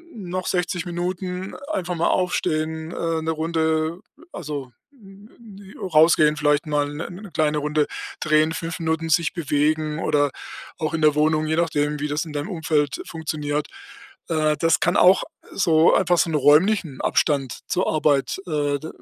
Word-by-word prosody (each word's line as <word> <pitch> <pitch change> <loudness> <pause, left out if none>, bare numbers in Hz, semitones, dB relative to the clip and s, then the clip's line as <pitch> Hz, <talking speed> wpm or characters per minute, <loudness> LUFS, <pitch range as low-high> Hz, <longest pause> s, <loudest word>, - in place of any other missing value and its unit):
noch 185 -3 -5
60 180 -1 -1
Minuten, 180 +1 -4 0.2
einfach 180 - -2
mal 170 - +1
aufstehen, 160 -3 -1
äh, 165 -2 -2
1 160 +1 -1
Runde, 160 +1 -1 0.3
also, 145 -6 -6 0.2
hm, 200 -4 -16
hm, 215 -4 -14 0.2
äh, - - -3
rausgehen, 155 -1 +5
vielleicht 150 +1 +2
mal 145 -1 0
1- 145 +2 -6
1 190 +1 -10
kleine 150 -1 +1
Runde 150 0 0 0.3
drehen, 155 +1 +2
5 165 0 -5
Minuten 160 0 -1
sich 165 +1 +2
bewegen 155 0 0
oder 145 -3 +1 0.5
auch 155 0 -3
in 160 - -1
der 150 -1 +4
Wohnung, 155 +1 +2
je 160 +1 0
nachdem, 150 -3 0
wie 150 - -2
das 150 0 -1
in 160 - -9
deinem 145 +5 -4
Umfeld 155 -5 -1
funktioniert. 150 -2 -3 0.6
Äh, 155 -2 +1
das 165 -1 +2
kann 175 - +1
auch 185 +2 +6 0.3
so 165 -3 +4
einfach 180 -2 +3
so 165 - +2
'n 155 - -1
räumlichen 150 +2 +3
Abstand 140 -4 0
zur 185 - 0
Arbeit, 145 -3 +1
äh, 145 -3 0
d 155 - -8
160 Hz, 165 wpm, -23 LUFS, 150-175 Hz, 0.6 s, auch